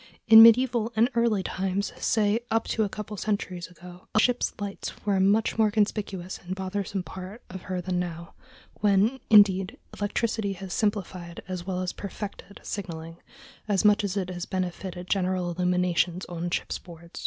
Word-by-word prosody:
In 220 0 +11
medieval 230 0 +6
and 230 +4 +3
early 235 -4 +2
times, 190 +2 -2
say 215 0 +2
up 225 0 +1
to 220 - +1
a 205 - -1
couple 210 +1 -7
of 205 - -6
centuries 185 -4 -2
ago, 180 0 -14
a - - +6
ship's 245 +2 +2
lights 200 -1 -5
were 205 -1 +2
a - - +2
much 210 +4 +2
more 215 -1 +5
conspicuous 200 -3 -1
and 180 +1 -4
bothersome 190 0 -3
part 190 +5 -9
of 190 -1 -7
her 185 0 -4
than 180 0 -2
now, 170 -1 -5 0.5
when, 210 +5 +3
indeed, 205 +1 +5 0.2
electricity 210 0 -1
has 190 -1 -7
simplified 185 -6 -2
as 185 -1 -5
well 185 -1 -2
as 185 - -3
perfected 200 0 -8
signaling 165 -4 -6 0.5
as 205 -1 +1
much 210 0 +5
as 200 0 -2
it 185 -2 -2
has 175 -1 -5
benefited 180 -1 -4
general 185 -2 0
illumination 180 0 +1
on 175 0 -4
ship's - - -2
board. 170 -1 -12
195 Hz, 170 wpm, -27 LUFS, 180-210 Hz, 0.5 s, In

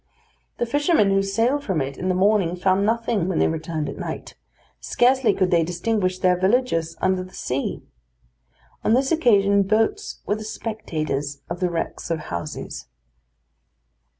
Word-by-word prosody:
The - - 0
fishermen 290 - +2
who 195 0 +3
sailed 230 +9 +1
from 190 - -1
it 135 0 -3
in 185 +5 -3
the 185 - +1
morning, 190 -2 +2
found 185 +2 +2
nothing 230 -5 0
when 185 - -1
they - - +3
returned 160 -1 -3
at 140 - -6
night; - - -6 0.5
scarcely 250 -2 +3
could 185 -2 0
they 170 -2 +4
distinguish 185 +2 -1
their 185 -1 +3
villages 185 -4 +1
under 185 -1 +1
the 185 - -13
sea. 130 +2 -3 1.0
On 220 - +3
this 265 +1 +1
occasion 200 -10 +4
boats 225 - 0
were - - +1
the 215 - -7
spectators 155 -11 -4
of 170 - -3
the 180 -1 +1
wrecks 170 0 -4
of 165 - 0
houses. 85 - -6
190 Hz, 155 wpm, -23 LUFS, 170-225 Hz, 1.0 s, they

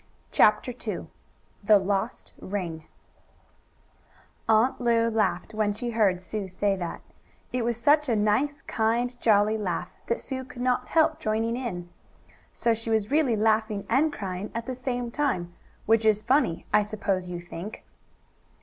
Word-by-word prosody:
CHAPTER 215 +4 +4 0.2
II - - -3 0.5
THE 210 +1 +7
LOST 200 +4 -2
RING 175 -5 -4 1.6
Aunt 225 +4 +3
Lu 230 -1 +3
laughed 215 -1 0
when 215 -1 +1
she 240 +3 -4
heard 205 -5 +2
Sue 195 +2 -5
say 195 +2 0
that. 175 -3 -5
And - - -33
it 250 -1 0
was 235 -1 0
such 290 +4 +3
a 230 - +3
nice, 255 +8 +1
kind, 235 +3 0
jolly 215 0 +3
laugh 185 -5 -2 0.2
that 235 - 0
Sue 260 -1 -5
could 255 -2 -7
not 250 -1 +1
help 315 -1 +3
joining 225 -2 0
in. 180 -9 -4 0.6
So 235 - +1
she 225 +1 -5
was 220 0 +1
really 290 -6 +3
laughing 215 -1 +1
and 285 +6 +3
crying 195 -5 -5
at 230 0 -3
the 260 - -3
same 245 -1 -3
time, 205 -12 -1 0.3
which 225 0 +3
is 215 -1 +3
funny, 250 - +2
I 210 - +6
suppose 205 -3 -2
you 175 -1 -5
think. 175 +4 -8
220 Hz, 155 wpm, -27 LUFS, 205-245 Hz, 1.6 s, THE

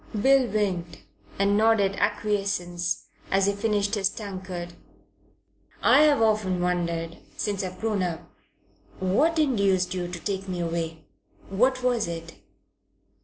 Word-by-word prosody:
Bill 265 +2 +5
winked 180 -7 -2 0.3
and 200 +1 +2
nodded 210 -2 +3
acquiescence 195 -4 -1 0.2
as 195 0 +3
he 200 - +2
finished 205 -1 0
his 195 -3 +2
tankard. 185 -4 -6 1.1
"I've 295 -5 +5
often 210 -4 +1
wondered 170 -2 -1 0.2
since 205 -1 -2
I've 185 0 -6
grown 215 -3 0
up 175 -2 -2 0.8
what 275 - +2
induced 200 - +2
you 180 -1 -3
to 175 0 -6
take 195 +1 -3
me 180 -1 -3
away. 165 -2 -3 0.5
What 255 +6 +2
was 245 -5 +1
it?" 165 0 -6
195 Hz, 120 wpm, -26 LUFS, 175-215 Hz, 1.1 s, Bill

